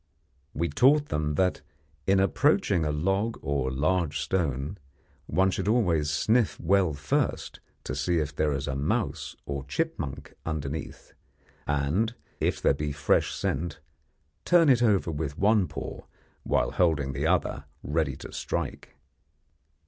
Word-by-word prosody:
We 85 Hz, +2 st, 0 dB
taught 140 Hz, -, +4 dB
them 75 Hz, -1 st, -1 dB
that, 90 Hz, +3 st, +1 dB, 0.5 s
in 95 Hz, 0 st, +4 dB
approaching 90 Hz, -3 st, +2 dB
a 75 Hz, -, 0 dB
log 95 Hz, +9 st, 0 dB
or 70 Hz, -2 st, 0 dB
large 75 Hz, +3 st, 0 dB
stone, 80 Hz, -2 st, -1 dB, 0.5 s
one 95 Hz, +1 st, +2 dB
should -, -, -2 dB
always 90 Hz, -10 st, +2 dB
sniff 110 Hz, +9 st, +2 dB
well 90 Hz, -1 st, +2 dB
first 70 Hz, -, -1 dB, 0.2 s
to -, -, -4 dB
see 85 Hz, -1 st, 0 dB
if 75 Hz, -2 st, -2 dB
there 75 Hz, 0 st, +1 dB
is 70 Hz, -1 st, -2 dB
a -, -, -2 dB
mouse 70 Hz, +2 st, -1 dB
or 70 Hz, -1 st, -4 dB
chipmunk 70 Hz, 0 st, -3 dB
underneath, 75 Hz, -2 st, -5 dB, 0.5 s
and, 75 Hz, +11 st, 0 dB, 0.2 s
if -, -, 0 dB
there -, -, +3 dB
be 75 Hz, +1 st, -3 dB
fresh 70 Hz, -1 st, +2 dB
scent, 80 Hz, +2 st, -2 dB, 0.6 s
turn 170 Hz, -3 st, +5 dB
it 125 Hz, -3 st, +5 dB
over 100 Hz, -7 st, +3 dB
with 75 Hz, -1 st, -4 dB
one 105 Hz, -1 st, +3 dB
paw 75 Hz, -, -7 dB, 0.4 s
while -, -, +1 dB
holding 75 Hz, -6 st, +1 dB
the -, -, -1 dB
other -, -, 0 dB, 0.2 s
ready 75 Hz, -2 st, 0 dB
to -, -, -10 dB
strike. -, -, -4 dB
80 Hz, 140 wpm, -27 LUFS, 70-95 Hz, 0.6 s, turn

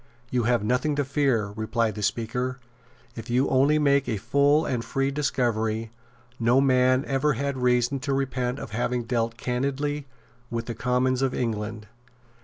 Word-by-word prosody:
"You 125 Hz, -3 st, +1 dB
have 120 Hz, -2 st, +2 dB
nothing 125 Hz, +6 st, +1 dB
to 145 Hz, -1 st, 0 dB
fear," 130 Hz, -7 st, +1 dB
replied 110 Hz, 0 st, 0 dB
the 105 Hz, -, -6 dB
Speaker, 125 Hz, +4 st, -1 dB, 0.6 s
"if 115 Hz, +1 st, -8 dB
you 125 Hz, +2 st, +3 dB
will -, -, -2 dB
only 140 Hz, +4 st, +4 dB
make 140 Hz, -2 st, +2 dB
a 110 Hz, -, 0 dB
full 140 Hz, +8 st, +3 dB
and 120 Hz, -3 st, -1 dB
free 135 Hz, +2 st, -1 dB
discovery. 115 Hz, -6 st, -1 dB, 0.5 s
No 120 Hz, +3 st, +4 dB
man 130 Hz, -1 st, +3 dB
ever 140 Hz, +2 st, +1 dB
had 140 Hz, +3 st, -2 dB
reason 125 Hz, +1 st, +2 dB
to 140 Hz, +1 st, -3 dB
repent 130 Hz, -2 st, -1 dB
of -, -, -7 dB
having 120 Hz, +2 st, -1 dB
dealt 115 Hz, -1 st, -1 dB
candidly 140 Hz, +4 st, -2 dB, 0.4 s
with 115 Hz, 0 st, -3 dB
the 120 Hz, -, -4 dB
Commons 125 Hz, +2 st, 0 dB
of 135 Hz, -1 st, 0 dB
England." 110 Hz, -2 st, -3 dB
125 Hz, 165 wpm, -25 LUFS, 115-135 Hz, 0.6 s, only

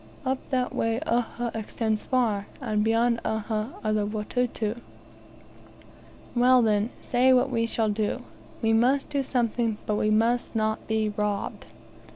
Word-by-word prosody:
"Up 260 Hz, 0 st, 0 dB
that 255 Hz, -2 st, 0 dB
way 225 Hz, +1 st, 0 dB
Uhha 235 Hz, 0 st, -1 dB
extends 220 Hz, 0 st, -2 dB
far; 225 Hz, -6 st, +1 dB
and 215 Hz, -6 st, 0 dB
beyond 230 Hz, +1 st, +2 dB
Uhha 220 Hz, +2 st, -2 dB
are 215 Hz, -1 st, +1 dB
the 210 Hz, -1 st, +1 dB
Watuta." 220 Hz, +1 st, -2 dB, 1.5 s
"Well, 250 Hz, 0 st, +5 dB
then, 210 Hz, 0 st, +2 dB
say 255 Hz, +1 st, +3 dB
what 255 Hz, +1 st, +3 dB
we 230 Hz, -1 st, +1 dB
shall 225 Hz, -1 st, 0 dB
do. 210 Hz, 0 st, -1 dB, 0.4 s
We 225 Hz, 0 st, +3 dB
must 255 Hz, +5 st, +3 dB
do 285 Hz, -1 st, 0 dB
something; 235 Hz, -4 st, 0 dB
but 210 Hz, -, 0 dB
we 215 Hz, -, +1 dB
must 230 Hz, +3 st, +1 dB
not 220 Hz, 0 st, -1 dB
be 220 Hz, -1 st, +1 dB
robbed." 205 Hz, -1 st, -3 dB
225 Hz, 145 wpm, -26 LUFS, 215-245 Hz, 1.5 s, Well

